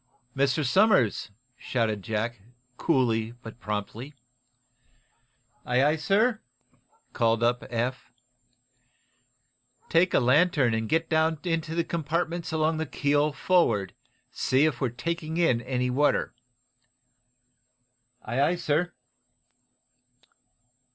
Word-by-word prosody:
"Mr. 140 +2 +1
Somers!" 185 - +3 0.3
shouted 110 -5 -1
Jack, 110 +2 -3 0.3
coolly 120 -7 0
but 115 +1 -10
promptly. 110 +6 -5 1.5
"Aye, 135 +5 +2
sir," 215 +8 +1 0.7
called 115 -1 +1
up 120 +1 +1
Eph. 120 +1 -3 1.8
"Take 175 +2 +3
a - - +5
lantern 135 -1 +3
and 110 -1 -2
get 165 0 +1
down 160 0 +1
into 165 -2 -2
the 170 - +1
compartments 170 +1 -2
along 160 0 +1
the 160 0 -3
keel 145 +2 +1
forward. 135 - +1 0.4
See 130 +3 +2
whether 145 -6 -2
we're 130 - +1
taking 160 +6 -4
in 145 -9 +2
any 125 0 -1
water." 145 +4 +1 1.9
"Aye, 120 +5 -1
aye, 155 +5 +3
sir." 175 +1 -1
140 Hz, 100 wpm, -26 LUFS, 120-165 Hz, 1.9 s, a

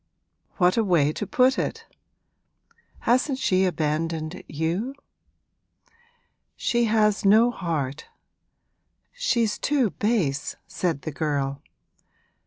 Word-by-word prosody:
What 180 +2 +3
a 225 - +3
way 160 -7 +2
to - - -4
put 260 -1 +3
it! - - -3 1.2
Hasn't 255 +3 +2
she 190 -7 +2
abandoned 160 0 -2
you?' 170 - -2 1.6
'She 240 0 +1
has 215 -2 +2
no 220 +4 +5
heart 160 - -3 1.1
she's 240 - 0
too 270 -8 +1
base!' 185 -11 -1
said 165 -7 -2
the 155 - -4
girl. 140 -2 -2
185 Hz, 95 wpm, -25 LUFS, 155-235 Hz, 1.6 s, no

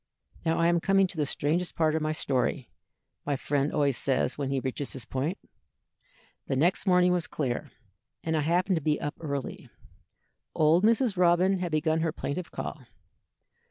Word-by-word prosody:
"Now 165 -1 +1
I 165 - +2
am 170 0 +3
coming 195 +2 +3
to 180 - -6
the 150 -2 0
strangest 165 +6 -1
part 155 -2 +2
of 160 - 0
my 155 0 0
story," 130 -3 -1 0.5
my 145 - -1
friend 140 +2 -1
always 140 -3 +1
says 135 -1 0
when 140 -2 -3
he 135 -1 0
reaches 130 +2 -3
this 130 -4 -6
point. 145 +8 -2 1.1
"The - - 0
next 175 +8 +1
morning 180 -1 +5
was 175 -2 -1
clear, 130 -5 -3 0.5
and 160 0 -1
I 155 - +2
happened 175 +4 +1
to - - -2
be 150 +1 +1
up 145 - -3
early. 140 -4 -5 0.9
Old 160 +4 +4
Mrs. 230 -2 +3
Robin 180 +2 +3
had 175 -2 -3
begun 155 +1 +1
her 160 0 0
plaintive 160 +2 -4
call. 150 - -6
160 Hz, 175 wpm, -28 LUFS, 145-175 Hz, 1.1 s, morning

